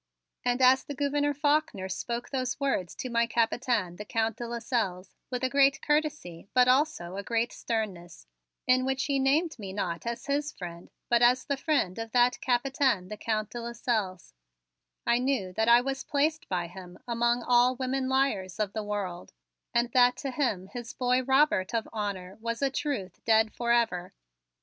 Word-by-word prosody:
And 245 +1 +1
as 260 +1 +6
the 285 - -7
Gouverneur 290 +1 0
Faulkner 290 -8 +1
spoke 235 +5 -4
those 255 -3 -2
words 270 -11 -1
to 255 - -5
my 235 0 +2
Capitaine, 230 -5 0
the 210 - -6
Count 225 0 -1
de 240 - -5
Lasselles, 220 -6 -2 0.2
with 250 0 -3
a - - +3
great 275 0 +4
courtesy 295 - -1
but 250 0 +6
also 255 - +1
a - - -2
great 230 +2 0
sternness, 185 - -4 0.4
in 255 0 +4
which 265 0 0
he 280 -1 +1
named 290 +2 +1
me 195 -2 -6
not 180 0 -3
as 235 0 -4
his 290 +1 -1
friend 175 - -9 0.2
but 240 0 +3
as 250 +1 +4
the 280 - 0
friend 270 - 0
of 225 -1 -6
that 245 0 +3
Capitaine, 250 -6 +1
the 215 - -5
Count 215 -1 -2
de 240 - -5
Lasselles, 230 -6 -3 0.7
I 235 +1 +3
knew 250 -8 -1
that 220 +4 +1
I 235 +1 +7
was 270 +1 -3
placed 310 +4 0
by 180 -2 -1
him 180 0 -11
among 240 0 +1
all 245 +1 +4
women 260 +1 -1
liars 220 -9 0
of 205 -2 -1
the 220 - -3
world 200 -4 -4 0.4
and 240 0 +1
that 245 0 +5
to 275 - -4
him 240 -9 -1
his 240 -2 -7
boy 250 0 +1
Robert 265 -6 +2
of 225 - -1
honor 200 -3 -4
was 230 +3 -3
of 275 - +3
a - - -16
truth 270 - -4
dead 220 -1 +3
forever. 235 -7 0
240 Hz, 180 wpm, -28 LUFS, 205-265 Hz, 0.7 s, I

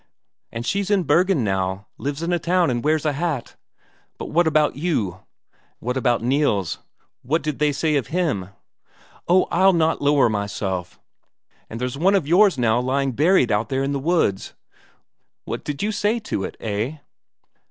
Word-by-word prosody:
"And 115 +1 -5
she's 200 +4 -1
in 200 -3 +2
Bergen 180 -5 +2
now; 95 0 -2
lives 145 +3 -4
in 175 +1 -1
a 175 - +1
town 175 -1 +1
and 120 -1 -2
wears 155 +1 +1
a 150 - +1
hat 145 -3 -3 0.6
but - - -7
what 170 +1 +3
about 155 -1 +2
you?" 115 - -2 0.6
"What 125 +2 -3
about 120 -3 +1
Nils 120 - 0 0.4
what 155 +7 -1
did 150 -2 -3
they 150 -1 +2
say 155 +2 0
of 135 - -2
him?" 150 - -1 0.8
"Oh, 185 +2 +4
I'll 190 +2 +4
not 165 -1 +1
lower 145 -2 +4
myself.... 100 -4 -3 0.7
But 115 - -6
there's 125 +3 -4
one 195 +5 +4
of 185 -7 +1
yours 185 0 +4
now 120 -1 +2
lying 135 +2 0
buried 150 0 +3
out 105 +4 0
there 135 0 0
in 140 - -1
the 140 - -1
woods 145 - 0 0.9
what - - -5
did 145 +2 -4
you 215 - 0
do 215 +2 0
to 105 - -3
it, - - -8
eh?" 110 +7 -3
145 Hz, 175 wpm, -22 LUFS, 115-170 Hz, 0.9 s, Oh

